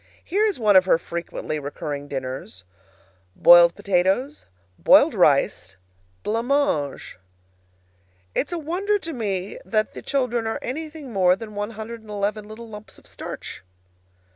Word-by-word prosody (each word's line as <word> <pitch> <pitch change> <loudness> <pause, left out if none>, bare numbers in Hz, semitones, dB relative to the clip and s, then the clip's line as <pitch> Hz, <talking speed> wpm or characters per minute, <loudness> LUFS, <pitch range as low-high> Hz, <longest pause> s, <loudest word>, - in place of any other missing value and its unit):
Here 415 +5 +1
is 410 - -1
one 210 -4 +3
of 185 -1 +7
her 185 - +4
frequently 170 -2 -5
recurring 145 0 -5
dinners: 130 -9 -6 0.7
Boiled 175 - +7
potatoes 200 +8 0 0.3
Boiled 85 - +6
rice - - +2 0.5
Blanc 230 +3 -1
mange 255 - -1 1.1
It's 295 - -1
a 345 - -2
wonder 365 +7 0
to 330 -5 -7
me 200 -6 -3
that 215 -1 -1
the - - -8
children 245 -5 -1
are 225 - -2
anything 300 -1 -6
more 185 -2 +4
than 215 +1 -9
one 205 +1 -3
hundred 225 +1 -8
and 220 - -17
eleven 210 +1 -2
little 225 +2 -10
lumps 210 -1 -11
of - - -20
starch. - - -8
215 Hz, 140 wpm, -23 LUFS, 180-260 Hz, 1.1 s, of